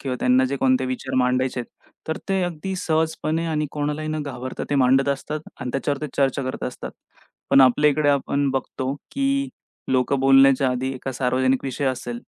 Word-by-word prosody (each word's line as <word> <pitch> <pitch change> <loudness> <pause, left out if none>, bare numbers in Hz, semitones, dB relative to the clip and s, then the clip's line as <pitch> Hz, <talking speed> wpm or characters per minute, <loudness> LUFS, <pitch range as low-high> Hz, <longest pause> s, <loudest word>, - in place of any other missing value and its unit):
किंवा 130 -2 -3
त्यांना 125 +1 +4
जे 140 +2 -2
कोणते 130 0 +2
विचार 130 0 -4
मांडायचे 125 0 +1
आहेत, 120 - -14 0.2
तर 160 - -1
ते 190 -1 +1
अगदी 175 +2 -4
सहजपणे 160 -1 -1
आणि 155 -2 -1
कोणालाही 150 +1 -2
न 155 -1 -2
घाबरता 130 -2 -5
ते 145 - +1
मांडत 135 +1 +3
असतात 150 +2 -3 0.2
अन् 125 - -3
त्याच्यावरती 145 +2 -2
चर्चा 135 0 +1
करत 130 - -5
असतात. 125 - -6 0.6
पण 135 - +7
आपल्या 145 +4 +5
इकडे 145 0 +1
आपण 140 0 0
बघतो, 130 0 -3 0.2
की 275 0 0 0.4
लोक 130 +1 +1
बोलण्याच्या 135 0 +5
आधी 130 +1 -2
एका 130 +1 -5
सार्वजनिक 130 +1 +1
विषय 135 +1 -3
असेल 120 -2 -3
135 Hz, 175 wpm, -23 LUFS, 130-150 Hz, 0.6 s, पण